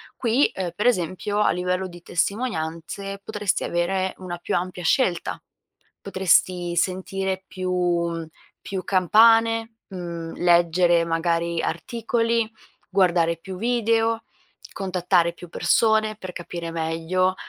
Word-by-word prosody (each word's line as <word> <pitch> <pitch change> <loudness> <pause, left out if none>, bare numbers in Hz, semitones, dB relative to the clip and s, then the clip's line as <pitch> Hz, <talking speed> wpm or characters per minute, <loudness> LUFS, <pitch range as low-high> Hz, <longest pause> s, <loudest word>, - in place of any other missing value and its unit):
qui, 245 +4 +2
ehm, 185 -2 -3
per 210 - -2
esempio 205 -2 0
a - - +4
livello 180 +1 -1
di 175 -1 -12
testimonianze 195 -1 -3
potresti 210 -3 -1
avere 185 +2 0
una 180 -2 -6
più 175 - -3
ampia 180 0 -3
scelta, 175 -1 +1 0.6
potresti 180 -2 +2
sentire 190 +1 -1
più 175 -3 -1 0.3
più 190 -2 -5
campane, 225 +4 +4
mhmm, 170 -3 -6
leggere 175 0 +4
magari 170 0 0
articoli, 230 +4 -1 0.4
guardare 175 -3 +2
più 185 +2 -8
video, 230 +1 +1 0.5
contattare 180 -3 +1
più 175 +1 -12
persone 220 +4 +2
per 185 -3 -8
capire 170 -1 -6
meglio 165 +3 0
185 Hz, 110 wpm, -24 LUFS, 170-210 Hz, 0.6 s, a